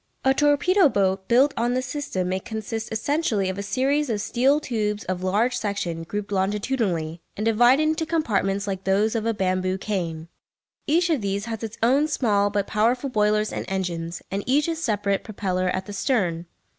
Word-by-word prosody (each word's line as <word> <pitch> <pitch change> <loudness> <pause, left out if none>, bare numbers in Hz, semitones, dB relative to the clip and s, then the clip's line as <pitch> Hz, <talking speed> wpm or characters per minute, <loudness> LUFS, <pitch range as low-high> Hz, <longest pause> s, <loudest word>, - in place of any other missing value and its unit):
A 265 - +5
torpedo 295 +5 +4
boat 190 -3 0
built 265 +4 +4
on 240 +2 0
this 255 0 -1
system 245 -9 -3
may 185 +1 -1
consist 220 +2 -5
essentially 220 - 0
of 190 +1 -4
a - - -1
series 270 +7 0
of 215 -3 0
steel 265 +7 +2
tubes 215 -6 -2
of 185 -1 -3
large 210 +7 +1
section 200 -6 -2
grouped 205 +3 -5
longitudinally, 195 -5 -1 0.2
and 215 - -2
divided 240 +6 +5
into 315 +1 0
compartments 205 - 0
like 195 -2 -4
those 200 +3 +2
of 225 -1 -1
a 230 - +2
bamboo 185 -1 0
cane. 170 -6 -3 0.6
Each 340 +3 +2
of 295 -7 +1
these 200 +1 -2
has 225 -2 -5
its 225 0 -6
own 275 +6 +4
small 210 -9 +1
but 205 -1 -1
powerful 245 +6 +1
boilers 210 -1 +1
and - - -3
engines, 175 -3 -3
and 200 +1 -2
each 290 +4 +3
its 330 -1 -2
separate 205 -6 0
propeller 185 -3 -2
at 185 +1 -2
the 205 - -8
stern. 185 - 0
210 Hz, 180 wpm, -24 LUFS, 190-255 Hz, 0.6 s, A